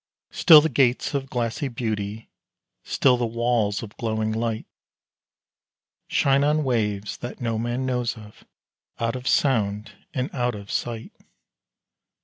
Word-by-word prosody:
Still 160 -4 +8
the 160 - +1
gates 125 -1 +2
of 135 -1 -2
glassy 120 +4 -2
beauty, 110 -3 -4 0.5
still 130 -2 +3
the 120 -1 0
walls 115 -3 0
of 110 -1 -10
glowing 110 -1 -1
light, 115 0 -2 1.4
Shine 140 0 +3
on 150 +1 +2
waves 105 -6 -1
that 120 - -7
no 115 -2 -1
man 120 +3 -2
knows 125 -2 -1
of, 105 -1 -14 0.6
out 115 +1 -1
of 130 0 -6
sound 105 -5 +1 0.2
and 130 0 -3
out 125 -3 -1
of 100 0 -9
sight. 115 -2 -3
120 Hz, 130 wpm, -24 LUFS, 110-130 Hz, 1.4 s, Still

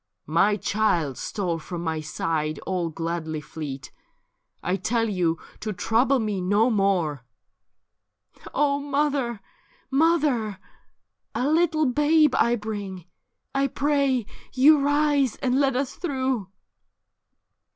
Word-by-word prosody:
' - - -57 0.2
My 205 +1 +3
child 180 -10 0
stole 180 -6 -2
from 175 +1 -6
my 160 -2 -2
side 155 0 -2
all 180 -3 -1
gladly 165 -1 -3
fleet; 140 -1 -7 0.7
I 180 - 0
tell 225 +4 0
yon 180 -5 +1 0.2
to 215 -1 -3
trouble 240 +8 +2
me 210 -5 -2
no 205 +6 +3
more.' 180 - +1 0.9
' - - -26
O 285 0 +2
mother, 280 -5 -1 0.5
mother! 275 - +2 0.8
a 255 - 0
little 315 0 +2
babe 295 +2 +3
I 235 0 +3
bring; 205 -5 -6 0.5
I 275 0 +2
pray 275 -3 +1 0.3
you 285 +4 +6
rise 290 -2 +2
and 260 0 0
let 270 -2 +2
us 265 +1 -1
through.' 260 - -2
225 Hz, 120 wpm, -25 LUFS, 180-280 Hz, 0.9 s, you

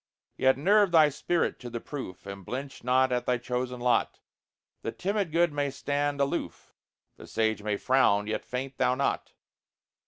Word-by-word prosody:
Yet 130 0 +3
nerve 200 +7 +4
thy 155 -3 +6
spirit 165 +4 -1
to 125 - -7
the 120 0 -4
proof, 130 -10 -7
And 100 0 -8
blench 135 +6 -6
not 130 +1 +3
at 125 -1 -1
thy 125 - +2
chosen 125 +1 -3
lot; 120 0 +1 0.6
The 115 - -3
timid 195 - -2
good 170 -1 +2
may 145 -1 0
stand 145 +1 -2
aloof, 140 0 -2 0.4
The - - -12
sage 110 -1 0
may 105 -1 -1
frown 105 -6 +3
yet 110 - -3
faint 130 +1 -5
thou 125 - +3
not. 140 +1 -1
130 Hz, 165 wpm, -28 LUFS, 120-145 Hz, 0.6 s, thy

